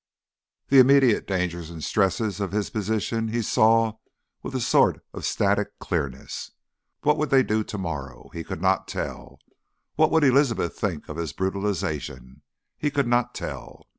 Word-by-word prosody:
The 135 - +7
immediate 130 -3 +5
dangers 90 -3 -2
and 80 -2 -8
stresses 100 0 0
of 100 -3 -2
his 105 -1 -1
position 110 +2 -1
he 115 +1 -1
saw 110 +1 +3 0.4
with - - -6
a - - +1
sort - - +2
of - - -6
static - - 0
clearness. 65 -1 -4 0.5
What 150 +1 +3
would 155 -1 0
they 135 -1 +5
do 110 -1 0
to 105 - -6
morrow? 70 -9 -6
He 85 - -5
could 80 - -6
not 95 -1 +2
tell. - - -6 0.6
What 155 0 +5
would 160 -1 +3
Elizabeth 130 - +3
think 90 -8 -3
of 75 - -7
his 85 -3 -3
brutalisation? 80 -9 -3 0.4
He 150 - +1
could 140 -1 0
not 120 0 +1
tell. - - -7
105 Hz, 160 wpm, -25 LUFS, 85-120 Hz, 0.6 s, The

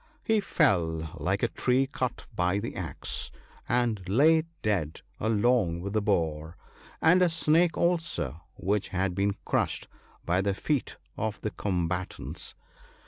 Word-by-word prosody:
He 220 -3 +3
fell 80 - +1
like - - 0
a - - +5
tree 130 +2 +2
cut 130 -2 -3
by 90 +1 +2
the 105 +3 -4
axe, - - -3 0.4
and 120 -4 +1
lay 155 +9 +5 0.2
dead 90 -8 0 0.2
along 110 -5 +2
with 100 +2 -4
the 110 - +2
boar, 80 -5 -1 0.5
and 180 +3 +6
a 180 - +5
snake 165 +1 +3
also, 165 - 0
which 100 +2 0
had 95 0 -1
been 100 +2 +1
crushed - - 0 0.4
by 90 +2 +2
the 100 0 0
feet 145 +4 -1 0.2
of 110 -1 -2
the 105 - -2
combatants. 90 -2 -3
105 Hz, 140 wpm, -28 LUFS, 90-130 Hz, 0.5 s, and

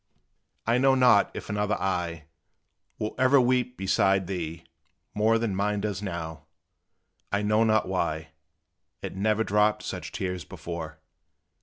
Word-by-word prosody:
I 115 +2 +2
know 135 0 +4
not 125 -5 +5
if - - -6
another 105 +1 0
eye 85 -4 -2 0.7
Will 105 - -3
ever 130 +2 +5
weep 125 0 +1
beside 95 0 +2
thee, 85 -3 -5 0.5
more 110 +2 +3
Than 115 -4 -1
mine 105 +1 0
does 105 -1 -3
now, 80 -6 -6 0.8
I 100 0 0
know 105 +2 +3
not 110 -1 +2
why 80 -4 -2 0.7
It - - -5
never 110 +3 +1
dropped 105 0 +2
such - - -5
tears 90 -2 -3
before. 80 -1 -7
105 Hz, 135 wpm, -27 LUFS, 90-110 Hz, 0.8 s, not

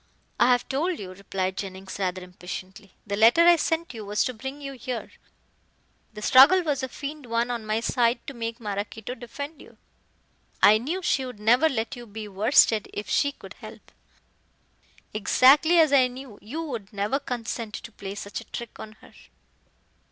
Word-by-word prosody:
"I - - +5
have 245 -1 +2
told 325 +6 -1
you," 185 -2 -8
replied 190 0 -3
Jennings, 190 -1 -6
rather 185 -1 -2
impatiently, 185 +2 -9
"the 200 -1 -2
letter 230 +10 +6
I 345 0 +8
sent 325 -1 -1
you 220 -2 -7
was 205 +1 0
to 255 - -2
bring 265 +5 -7
you 275 -1 -7
here. 250 -1 -6 1.0
The 210 - -7
struggle 290 - +7
was 295 -4 -1
a 260 - -3
feigned 290 +1 -7
one 235 +1 0
on 230 -3 -4
my 215 +1 0
side 235 0 +1
to 275 - -7
make 230 -1 -5
Maraquito 210 +2 -5
defend 280 +6 -8
you. - - -16 0.8
I 215 +1 +6
knew 335 +11 -3
she 270 - +1
would 250 -4 -8
never 245 +9 +4
let 230 -2 -3
you 240 -1 -10
be 215 0 -7
worsted 215 +2 +3
if 205 - -6
she 285 - +2
could - - -13
help; - - -12 1.2
exactly 275 - +5
as 315 -3 +5
I 260 -2 +6
knew 250 -3 -10
you 295 +10 -5
would 235 -11 -6
never 205 +7 -1
consent 235 -4 -5
to 230 - -8
play 200 -1 -7
such 200 0 -6
a - - -14
trick 235 -2 -8
on 215 - -9
her." - - -17
235 Hz, 180 wpm, -25 LUFS, 210-275 Hz, 1.2 s, I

